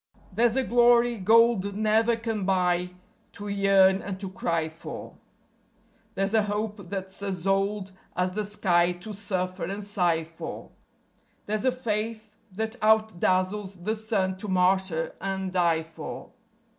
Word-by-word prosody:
There's 230 +3 +3
a 265 - +2
glory 240 -1 +4
gold 220 -1 +4
never 220 +2 +3
can 225 -3 -3
buy 180 -2 +1 0.4
to 205 - -7
yearn 195 -1 +4
and 190 -2 -5
to 190 -2 -5
cry 180 -7 -1
for; 160 +1 -9 1.0
There's 195 +1 0
a 220 - +5
hope 210 -2 -3
that's 190 0 -5
as 190 -3 -4
old 195 0 0 0.2
as 180 0 0
the 210 +3 -2
sky 180 -4 +2
to 180 +5 -9
suffer 185 -3 -3
and 200 +4 -4
sigh 175 -5 +1
for; 165 +1 -8 0.7
There's 215 +3 -2
a 260 - +4
faith 220 -3 -3 0.2
that 220 +4 -4
out 220 -3 +3
dazzles 185 +2 0
the 215 +3 0
sun 210 -4 -1
to 210 - -6
martyr 185 -3 +1
and 190 -1 -3
die 170 -3 +2
for. 160 -1 -8
195 Hz, 145 wpm, -26 LUFS, 185-215 Hz, 1.0 s, a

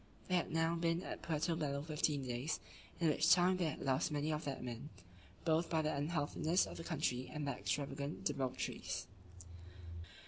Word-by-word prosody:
They 185 - +3
had 175 - +1
now 165 +1 +2
been 165 +1 +1
at - - -5
Puerto 165 +1 0
Bello 140 -3 -1
fifteen 150 -2 0
days, 125 +5 -1 0.4
in 165 -2 +4
which 155 +2 +3
time 185 +1 +6
they 180 - +1
had 155 - -2
lost 135 +3 +2
many 150 +1 0
of 150 - -3
their 140 -2 -2
men, 125 +3 -5 0.6
both 160 +1 +3
by 160 -1 +2
the 155 - +1
unhealthiness 155 +3 +1
of - - -8
the 165 - -5
country, 140 -6 -1
and 150 -2 -3
their 140 - -2
extravagant 140 0 -2
debaucheries. 130 -2 -2
155 Hz, 175 wpm, -38 LUFS, 140-165 Hz, 0.6 s, time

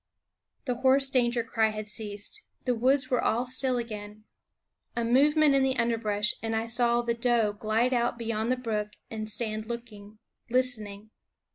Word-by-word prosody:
The 250 -3 -1
hoarse 270 +2 +3
danger 240 -2 +2
cry 225 -1 +1
had 215 0 -6
ceased; 210 - -5 0.2
the 250 - +2
woods 260 +3 +1
were 250 - +2
all 240 +3 +1
still 255 0 +1
again. 215 -2 -6 0.7
A 235 - -1
movement 290 +5 +4
in 275 - +4
the 265 0 +1
underbrush, 220 -3 +1
and 225 0 -2
I 220 +1 -1
saw 235 0 +2
the 235 0 0
doe 230 -3 +1
glide 220 +4 0
out 240 -1 +1
beyond 230 0 -2
the 255 - +1
brook 210 -4 -3 0.2
and 215 -1 -5
stand 215 -1 -2
looking, 220 -3 -8 0.3
listen 250 -3 +1
ing. 205 +2 -11
235 Hz, 165 wpm, -28 LUFS, 215-250 Hz, 0.7 s, movement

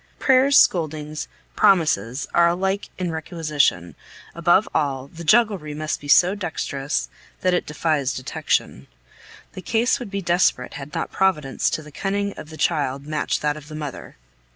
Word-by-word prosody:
Prayers, 270 +1 +4
scoldings, 155 -3 +1 0.3
promises, 155 - +2
are 170 0 +5
alike 190 +3 -1
in 180 -2 -2
requisition; 155 - -1 0.4
above 175 +5 +3
all, 135 -4 -1
the 170 +4 -10
jugglery 200 -6 +2
must 155 0 -3
be 145 - -9
so 180 +6 +5
dexterous 155 -7 -3 0.3
that 185 -1 +2
it 180 - 0
defies 150 -3 0
detection. 70 - -2 0.7
The 185 - -8
case 230 +5 +1
would 245 -5 -7
be 200 -1 -4
desperate 175 -7 +1
had 140 +1 -8
not - - -3
Providence 150 -8 +1
to 155 - -3
the 150 - -13
cunning 200 +4 -2
of 155 - -10
the 160 - -10
child 140 -5 0
matched 150 0 -2
that 150 0 +1
of 150 -1 -11
the 155 - -9
mother. 150 -4 -7
160 Hz, 155 wpm, -22 LUFS, 145-190 Hz, 0.7 s, are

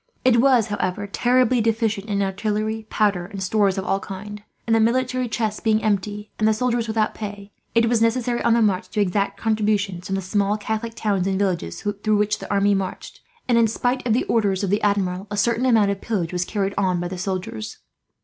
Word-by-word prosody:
It 235 -2 +5
was, 255 -4 +4
however, 205 -1 -2
terribly 245 +3 +2
deficient 225 -2 0
in 200 -2 0
artillery, 215 +3 -2
powder, 200 -5 +1
and 195 -1 -6
stores 195 0 +2
of 190 - -2
all 195 - +1
kinds 205 +2 -8 0.2
and, 225 - +2
the - - +4
military 255 +2 +1
chest 220 -2 -2
being 220 -1 +2
empty 210 0 -1
and 215 - +3
the 220 - +3
soldiers 240 -1 0
without 220 -1 0
pay, 205 -1 -7 0.2
it 230 0 +4
was 230 -1 +2
necessary, 240 +1 +1
on 235 -1 +3
the 235 - +3
march, 195 -3 +1
to 215 - -3
exact 200 0 0
contributions 205 -5 0
from 195 - -1
the 195 - -3
small 200 +2 0
Catholic 220 +2 -4
towns 200 -4 0
and 190 -1 0
villages 180 - -2 0.2
through 215 -1 +2
which 210 0 +1
the - - -7
army 200 0 +3
marched 195 -1 -4 0.3
and, 240 -2 +4
in 230 - +4
spite 245 +3 -1
of 225 - +3
the 245 - +2
orders 205 -4 +1
of 195 - -1
the 205 - +1
Admiral, 195 -2 0
a 205 - -4
certain 235 +4 +1
amount 220 -5 +4
of 200 - -4
pillage 185 -7 -2
was 180 0 -1
carried 200 -1 -2
on 185 -3 +1
by 175 - -2
the 180 0 -6
soldiers. 185 - -4
210 Hz, 215 wpm, -22 LUFS, 195-225 Hz, 0.3 s, It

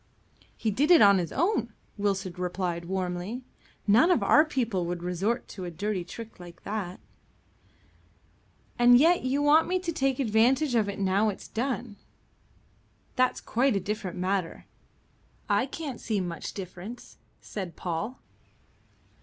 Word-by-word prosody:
"He 220 - -1
did 280 +9 +1
it 345 -9 +8
on 200 -1 +6
his 170 -3 -3
own," 300 - 0 0.2
Wilson 195 -3 -1
replied 180 -1 -3
warmly. 185 +6 -3 0.4
"None 225 - +5
of 360 - +3
our 300 - +6
people 235 - -1
would 175 0 -4
resort 190 +7 -1
to 190 - -8
a 175 - -4
dirty 195 +2 -3
trick 225 +5 -10
like 175 -1 -12
that." 195 -4 -4 1.8
"And 245 0 +7
yet 335 +6 +4
you 270 +3 0
want 300 +2 +5
me 370 - +1
to 360 -2 -3
take 270 -4 0
advantage 255 +4 +2
of 220 -4 +2
it 200 - -5
now 200 +2 +2
it's 200 - -7
done." 235 -3 -3 1.2
"That's 255 -1 +2
quite 250 0 +1
a - - +2
different 205 -2 -4
matter." 185 -1 -2 0.8
"I 205 +5 +2
can't 285 -3 -6
see 215 -3 -1
much 175 -3 -5
difference," 195 +4 -9 0.2
said 185 -5 -6
Paul. 180 +9 -4
210 Hz, 145 wpm, -28 LUFS, 185-255 Hz, 1.8 s, it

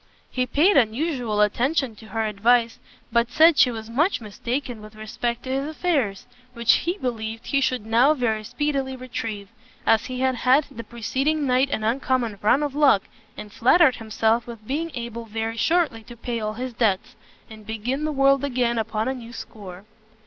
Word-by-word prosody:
He 255 -1 -1
paid 330 +10 +4
unusual 240 -2 +1
attention 245 +4 +1
to 220 - -13
her 220 +2 -2
advice, 230 +3 +2 0.3
but 235 +1 +2
said 315 +4 +5
she 255 - +6
was 220 -2 -6
much 300 - +1
mistaken 235 +2 -4
with 215 0 -12
respect 235 +2 -4
to 260 - -5
his 270 +2 -1
affairs, 290 - -1 0.3
which 235 -1 +3
he 350 +3 0
believed 225 - -4
he 275 - +1
should 250 -3 0
now 240 +7 +4
very 220 -5 -1
speedily 265 +2 -2
retrieve, 225 -5 -6 0.4
as 225 +1 +3
he 255 -1 -4
had 260 -1 +1
had 260 +5 +3
the 230 -3 -8
preceding 265 +7 -1
night 260 +1 +2
an 220 - -2
uncommon 235 -2 0
run 255 +8 +3
of 290 -2 -2
luck, 280 -9 +4 0.3
and 210 -1 -9
flattered 260 +2 +4
himself 225 +1 0
with 230 -3 -10
being 310 +7 -2
able 235 -1 -5
very 225 +1 -3
shortly 320 -3 +1
to 240 - -12
pay 235 0 -3
all 215 -1 -3
his 250 +2 -5
debts, 215 -5 0 0.3
and 215 -2 -13
begin 235 +6 -3
the 310 - -1
world 275 -1 +3
again 245 -4 0
upon 220 0 -2
a 260 - 0
new 235 -3 -9
score. 205 -5 -10
240 Hz, 180 wpm, -23 LUFS, 220-270 Hz, 0.4 s, she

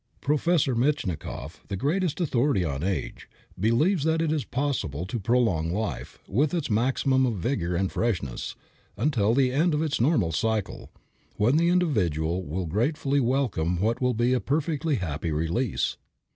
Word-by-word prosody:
Professor 150 -2 +2
Metchnikoff, 120 - -2
the - - -3
greatest 155 - 0
authority 135 - +1
on 70 -3 -3
age, 90 -7 -3 0.3
believes 140 - +2
that 160 +1 +2
it 160 -2 +1
is 155 -3 0
possible 120 - -2
to 115 +5 -4
prolong 95 -8 +1
life, 105 +4 -4
with 140 - +1
its 155 -8 -2
maximum 130 +4 +2
of 115 - -1
vigor 90 -3 -1
and 95 +2 0
freshness, 90 - -2 0.4
until 115 -3 +2
the 130 -2 +3
end 155 +4 +2
of 150 - 0
its 150 -7 -1
normal 120 - +2
cycle, 110 +5 -2 0.5
when 110 +7 +2
the 170 +2 +3
individual 95 - +1
will 90 +4 -3
gratefully 135 - 0
welcome 115 -10 0
what 115 +5 0
will 125 -1 +1
be 120 +3 +2
a 130 - +2
perfectly 155 +2 0
happy 85 - -3
release. 85 +10 -1
120 Hz, 155 wpm, -26 LUFS, 95-145 Hz, 0.5 s, the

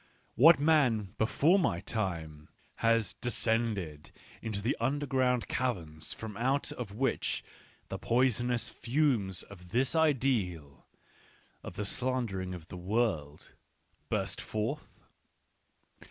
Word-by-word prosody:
What 155 +6 +7
man, 130 -10 +3
before 155 - +4
my 85 - +1
time, 85 -8 -4 0.3
had 115 -4 +2
descended 110 -10 -1 0.3
into 110 -3 -3
the 115 +7 0
under 140 +5 0
ground 130 -3 +1
caverns 80 -11 -2
from 110 -2 -6
out 135 +4 0
of 120 -6 -6
which 135 +4 0 0.5
the - - -4
poisonous 120 -1 +1
fumes 120 - 0
of 90 -3 -13
this 125 - +1
ideal 115 - +1 0.4
— - - -32
of - - -8
this 105 -1 -2
slandering 115 -8 -2
of 80 -2 -11
the 90 - -7
world 90 -7 -1 0.3
— - - -41
burst - - -2
forth 115 +8 -4
115 Hz, 120 wpm, -31 LUFS, 95-130 Hz, 0.5 s, What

